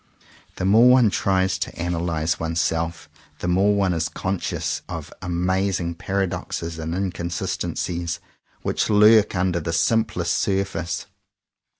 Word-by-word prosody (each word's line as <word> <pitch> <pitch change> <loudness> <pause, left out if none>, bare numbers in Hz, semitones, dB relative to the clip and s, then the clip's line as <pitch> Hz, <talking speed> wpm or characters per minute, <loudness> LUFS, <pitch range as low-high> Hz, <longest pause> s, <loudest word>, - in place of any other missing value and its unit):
The 95 - -3
more 110 +6 +6
one 125 -4 +6
tries 95 -1 +1
to 95 - -4
analyze 85 -2 -1
oneself 80 0 -1 0.3
the - - -4
more 95 +4 +3
one 95 -3 +2
is 80 0 -1
conscious 95 +3 -2
of - - -6
amazing 90 0 0
paradoxes 85 -3 -3
and 80 +1 -3
inconsistencies 85 -2 -3 0.4
which - - 0
lurk 105 0 +6
under 90 -1 +1
the 80 0 -3
simplest 85 -1 +1
surface. 95 -4 -1
90 Hz, 115 wpm, -23 LUFS, 85-95 Hz, 0.4 s, more